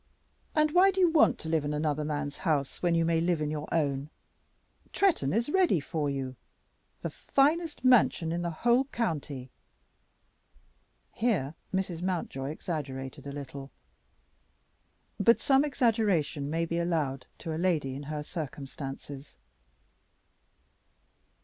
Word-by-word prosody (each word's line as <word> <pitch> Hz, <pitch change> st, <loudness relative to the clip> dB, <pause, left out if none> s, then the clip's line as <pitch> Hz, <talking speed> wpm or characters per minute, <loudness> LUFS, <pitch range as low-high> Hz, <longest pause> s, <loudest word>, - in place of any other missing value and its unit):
And 305 Hz, -1 st, +3 dB
why 365 Hz, +4 st, +6 dB
do 385 Hz, 0 st, -1 dB
you 355 Hz, -3 st, +5 dB
want 320 Hz, -, +5 dB
to -, -, -7 dB
live 160 Hz, -2 st, +1 dB
in 145 Hz, +1 st, -2 dB
another 150 Hz, 0 st, 0 dB
man's 145 Hz, -1 st, -3 dB
house 150 Hz, -6 st, -1 dB
when 175 Hz, -1 st, +2 dB
you 165 Hz, 0 st, +3 dB
may 165 Hz, 0 st, +2 dB
live 170 Hz, -1 st, +1 dB
in 150 Hz, -1 st, -1 dB
your 150 Hz, 0 st, -5 dB
own? 145 Hz, -3 st, 0 dB, 0.8 s
Tretton 345 Hz, -, +2 dB
is 230 Hz, +3 st, +1 dB
ready 350 Hz, -, +3 dB
for 150 Hz, 0 st, -2 dB
you, 135 Hz, -2 st, -3 dB, 0.7 s
the -, -, -3 dB
finest 300 Hz, 0 st, +1 dB
mansion 220 Hz, -9 st, +4 dB
in 170 Hz, +1 st, -1 dB
the 175 Hz, -, -1 dB, 0.2 s
whole 240 Hz, +3 st, +5 dB
county." 150 Hz, -, -3 dB, 1.6 s
Here 185 Hz, -, 0 dB, 0.2 s
Mrs. 190 Hz, -3 st, -2 dB
Mountjoy 170 Hz, -7 st, -2 dB
exaggerated 140 Hz, -5 st, -5 dB
a -, -, -4 dB
little, 140 Hz, -1 st, -7 dB, 1.5 s
but 230 Hz, +4 st, +5 dB
some 275 Hz, -1 st, +4 dB
exaggeration 210 Hz, -, +1 dB
may 165 Hz, +2 st, 0 dB
be 170 Hz, +1 st, -2 dB
allowed 155 Hz, -6 st, -1 dB
to 165 Hz, -2 st, -5 dB
a 160 Hz, -, -3 dB
lady 155 Hz, -8 st, +1 dB
in 135 Hz, -, -6 dB
her 150 Hz, -1 st, -3 dB
circumstances. 140 Hz, -2 st, -7 dB
160 Hz, 135 wpm, -29 LUFS, 145-220 Hz, 1.6 s, why